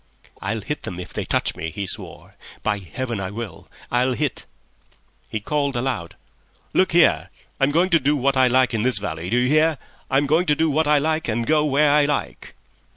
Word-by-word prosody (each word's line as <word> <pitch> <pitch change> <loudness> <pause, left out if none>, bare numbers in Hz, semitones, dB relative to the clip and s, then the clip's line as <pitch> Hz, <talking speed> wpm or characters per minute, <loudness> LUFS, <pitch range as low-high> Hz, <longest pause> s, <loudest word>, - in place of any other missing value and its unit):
"I'll 110 - -2
hit 150 +8 -4
them 90 -1 -6
if 90 - -8
they - - -3
touch - - 0
me," 80 - -4
he 100 +6 -5
swore; - - -7 0.3
"by 105 - 0
Heaven, 115 +4 -5
I 95 -1 -3
will. 105 -4 -8 0.2
I'll 125 +1 +2
hit." 120 - -2 0.8
He 110 - -3
called 140 +4 -1
aloud, 120 -9 -3 0.6
"Look 185 - +3
here, 170 0 +4 0.3
I'm 135 0 +3
going 170 +5 +2
to 165 - +5
do 145 +1 +2
what 135 0 +1
I 130 -1 +5
like 130 0 +3
in 110 - 0
this 125 +2 +3
valley! 80 +3 -4
Do 120 - +1
you 125 +1 +2
hear? 155 +2 +3 0.3
I'm 135 +2 +2
going 160 +5 +2
to 150 - +3
do 160 +1 +1
what 155 +2 +1
I 150 0 +5
like 155 +2 0
and 115 +1 -1
go 150 +1 +3
where 145 +1 +3
I 150 0 +4
like." 145 0 -3
135 Hz, 210 wpm, -22 LUFS, 115-150 Hz, 0.8 s, to